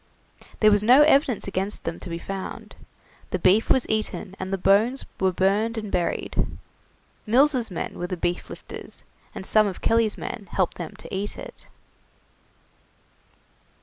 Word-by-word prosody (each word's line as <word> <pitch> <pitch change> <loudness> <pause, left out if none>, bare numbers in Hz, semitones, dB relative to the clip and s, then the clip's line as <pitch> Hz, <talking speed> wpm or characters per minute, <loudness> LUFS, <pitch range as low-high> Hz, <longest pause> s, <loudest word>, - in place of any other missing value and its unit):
There 215 -1 +7
was 205 0 +3
no 255 +6 +7
evidence 275 -8 +3
against 195 +1 -3
them 165 0 -4
to 180 - -8
be 170 - -3
found; 195 +2 -7 0.6
the - - -1
beef 190 +5 +3
was 260 - +3
eaten 215 -3 -2
and 185 0 -4
the 195 - 0
bones 215 +8 +3
were 190 -1 +2
burned 205 +5 +1
and 215 -2 -4
buried. 175 -1 -1 0.7
Mills' 255 0 +4
men 180 - -5
were 175 - -2
the 180 - -4
beef 175 +1 -2
lifters, - - -9 0.3
and - - -6
some 215 +1 +4
of 190 - -5
Kelly's 225 -2 +2
men 205 -4 -6
helped 185 -2 0
them 170 -3 -6
to - - -8
eat 200 +2 -3
it. - - -10
200 Hz, 155 wpm, -24 LUFS, 185-225 Hz, 0.7 s, There